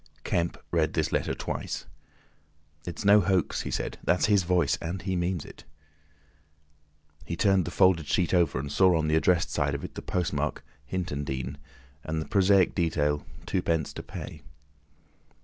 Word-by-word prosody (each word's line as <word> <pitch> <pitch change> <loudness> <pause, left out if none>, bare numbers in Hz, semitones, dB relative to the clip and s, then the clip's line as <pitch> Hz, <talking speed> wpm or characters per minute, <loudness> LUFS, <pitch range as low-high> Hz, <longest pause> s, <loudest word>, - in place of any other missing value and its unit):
Kemp 85 -1 -1
read 80 -2 +1
this - - 0
letter - - 0
twice, - - -4 1.0
"It's 85 +4 -5
no 105 +1 +7
hoax," 95 -1 +1
he - - -5
said. - - -3
"That's 90 - +2
his 105 -2 +4
voice! 90 0 +2
And 85 +3 -4
he 95 -1 -1
means 90 -2 -1
it." - - -13 1.6
He 85 0 -4
turned 95 0 +3
the - - -3
folded 90 -5 +3
sheet 90 -1 +1
over 85 -7 +3
and 70 +2 -4
saw 95 -3 +4
on 80 -1 0
the 80 - +3
addressed 85 +1 +2
side 70 -2 0
of 70 - -5
it - - -7
the - - -6
postmark 80 -5 -2 0.3
Hintondean, 70 -8 -3 0.5
and 80 0 -2
the 80 - -5
prosaic 100 -2 +4
detail 75 -4 0 0.2
"2d. 85 -5 -1
to - - -6
pay." 75 - -8
85 Hz, 160 wpm, -28 LUFS, 80-95 Hz, 1.6 s, no